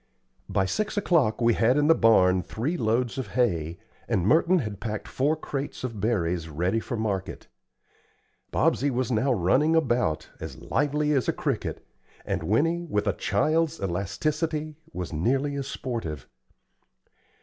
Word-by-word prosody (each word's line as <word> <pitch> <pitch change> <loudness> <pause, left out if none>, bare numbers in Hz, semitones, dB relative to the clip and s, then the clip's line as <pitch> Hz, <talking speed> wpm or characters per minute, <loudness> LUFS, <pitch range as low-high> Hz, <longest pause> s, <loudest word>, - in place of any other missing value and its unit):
By 95 - +1
six 215 - -2
o'clock, 155 - +2
we 120 0 +4
had 120 +5 +3
in 145 - +3
the 165 - +7
barn 95 - +4
three 115 - -3
loads 120 -1 0
of 130 - -3
hay, 85 -9 +1 0.3
and 100 -7 +1
Merton 165 - +4
had 105 - -3
packed 110 -1 -4
four 145 +4 +1
crates 145 -3 -5
of 115 -5 -4
berries 90 -7 0
ready 90 +8 0
for 115 - -4
market. 100 -3 -3 1.1
Bobsey 140 +3 +2
was 130 -1 -1
now 125 +4 +2
running 130 - +3
about, 120 - +1
as - - -7
lively 150 +1 0
as 135 -4 +1
a - - +2
cricket, - - -3 0.4
and - - -2
Winnie, 165 - +1
with 105 -4 0
a 100 - +1
child's 155 +12 +1
elasticity, 150 - -2 0.2
was 90 -2 -5
nearly 135 - +1
as 140 -1 -3
sportive. 100 - -5
120 Hz, 150 wpm, -26 LUFS, 95-150 Hz, 1.1 s, the